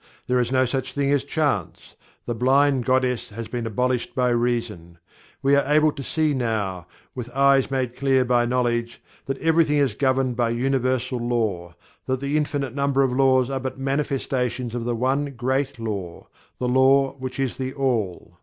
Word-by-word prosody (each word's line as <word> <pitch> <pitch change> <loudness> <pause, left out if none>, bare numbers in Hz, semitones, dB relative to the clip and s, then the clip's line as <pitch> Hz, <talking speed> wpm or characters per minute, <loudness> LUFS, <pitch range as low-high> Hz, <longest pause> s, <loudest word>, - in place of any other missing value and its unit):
There 125 0 +1
is 120 0 0
no 130 0 +3
such 130 +1 -3
thing 140 -1 0
as 145 -2 +2
Chance. 100 - -2 0.3
The 120 - -2
blind 130 +2 +2
goddess 130 -2 +1
has 115 +2 -7
been 120 -2 -4
abolished 125 +3 -1
by 125 -1 +2
Reason. 115 -8 -2 0.5
We 140 +1 +4
are 140 0 +1
able 155 0 +4
to 140 - -8
see 155 +2 0
now, 105 - -2 0.3
with 125 -2 -6
eyes 140 -1 +4
made 130 -3 -2
clear 135 -2 +2
by 120 -1 +2
knowledge, 120 -1 -1 0.3
that 135 0 -2
everything 160 -1 +2
is 140 -6 +2
governed 130 +1 +1
by 120 -1 +1
Universal 130 0 0
Law 110 -8 -2 0.3
that 130 -1 0
the 140 +2 -2
infinite 145 -4 -1
number 140 0 +1
of 130 -2 0
laws 130 -1 +3
are 135 - -1
but 130 0 -5
manifestations 135 -3 -2
of 120 -1 -3
the 120 0 -1
One 135 +3 -1
Great 130 +3 -1
Law 100 -7 -6 0.3
the 125 - -2
LAW 135 +2 +4
which 130 0 -6
is 135 -3 -1
THE 130 -1 -3
ALL. 110 -11 -2
130 Hz, 175 wpm, -23 LUFS, 120-135 Hz, 0.5 s, We